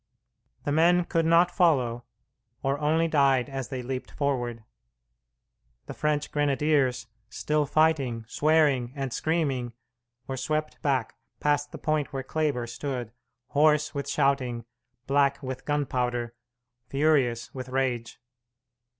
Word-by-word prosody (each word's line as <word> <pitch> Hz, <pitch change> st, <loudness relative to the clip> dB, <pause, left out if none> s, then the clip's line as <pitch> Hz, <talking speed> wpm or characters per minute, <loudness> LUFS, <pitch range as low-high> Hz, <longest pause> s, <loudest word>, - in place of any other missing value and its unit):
The 145 Hz, -, -1 dB
men 170 Hz, +3 st, +4 dB
could 165 Hz, -1 st, 0 dB
not 170 Hz, +2 st, +5 dB
follow, 125 Hz, -, +2 dB, 0.6 s
or 135 Hz, +1 st, 0 dB
only 160 Hz, +2 st, +2 dB
died 135 Hz, -5 st, +3 dB
as 135 Hz, -2 st, -4 dB
they 130 Hz, -2 st, -5 dB
leaped 130 Hz, +1 st, -4 dB
forward. 120 Hz, -5 st, -2 dB, 1.2 s
The -, -, -7 dB
French 150 Hz, -1 st, -1 dB
grenadiers, 145 Hz, -3 st, +1 dB, 0.2 s
still 150 Hz, -1 st, 0 dB
fighting, 135 Hz, -7 st, +1 dB
swearing, 145 Hz, -4 st, +2 dB
and 135 Hz, -3 st, -3 dB
screaming, 140 Hz, -7 st, -1 dB, 0.5 s
were 135 Hz, -, -4 dB
swept 155 Hz, +3 st, -2 dB
back 130 Hz, -6 st, 0 dB, 0.2 s
past 145 Hz, 0 st, +1 dB
the -, -, -7 dB
point 155 Hz, -2 st, -1 dB
where 135 Hz, -1 st, -4 dB
Kleber 145 Hz, -4 st, -1 dB
stood, 120 Hz, -1 st, -5 dB, 0.4 s
hoarse 150 Hz, +1 st, +3 dB
with 140 Hz, -2 st, -4 dB
shouting, 125 Hz, -4 st, 0 dB, 0.4 s
black 140 Hz, +1 st, +2 dB
with 130 Hz, -1 st, -5 dB
gunpowder, 125 Hz, -5 st, -1 dB, 0.5 s
furious 135 Hz, -4 st, +1 dB
with 130 Hz, -1 st, -7 dB
rage. 125 Hz, -3 st, -2 dB
140 Hz, 120 wpm, -27 LUFS, 125-150 Hz, 1.2 s, not